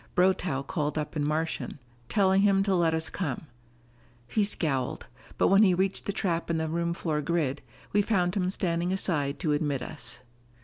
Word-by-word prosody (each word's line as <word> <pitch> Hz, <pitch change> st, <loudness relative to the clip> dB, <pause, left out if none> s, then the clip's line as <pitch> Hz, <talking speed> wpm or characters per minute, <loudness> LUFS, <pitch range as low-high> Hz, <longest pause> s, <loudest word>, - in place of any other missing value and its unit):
Brotow 180 Hz, -6 st, +2 dB
called 150 Hz, -1 st, -2 dB
up 150 Hz, 0 st, -3 dB
in 150 Hz, -, 0 dB
Martian, 155 Hz, +2 st, -2 dB, 0.3 s
telling 195 Hz, -2 st, +3 dB
him 195 Hz, -1 st, +4 dB
to 195 Hz, -1 st, +1 dB
let 170 Hz, -3 st, +2 dB
us 160 Hz, 0 st, +2 dB
come. 160 Hz, -5 st, -3 dB, 0.8 s
He 215 Hz, -, +1 dB
scowled, 145 Hz, -10 st, -1 dB, 0.3 s
but -, -, +3 dB
when 195 Hz, +2 st, +6 dB
we 190 Hz, -4 st, +5 dB
reached 190 Hz, +1 st, -1 dB
the -, -, 0 dB
trap 170 Hz, -4 st, -1 dB
in 165 Hz, -, +1 dB
the 160 Hz, 0 st, -1 dB
room 170 Hz, +1 st, -1 dB
floor 155 Hz, -4 st, -1 dB
grid, 150 Hz, -3 st, -1 dB, 0.3 s
we 205 Hz, -, +5 dB
found 180 Hz, -4 st, +1 dB
him 185 Hz, -3 st, 0 dB
standing 175 Hz, -2 st, 0 dB
aside 150 Hz, -7 st, 0 dB
to 155 Hz, -, +1 dB
admit 145 Hz, -3 st, -1 dB
us. 120 Hz, -6 st, -6 dB
170 Hz, 180 wpm, -28 LUFS, 150-190 Hz, 0.8 s, when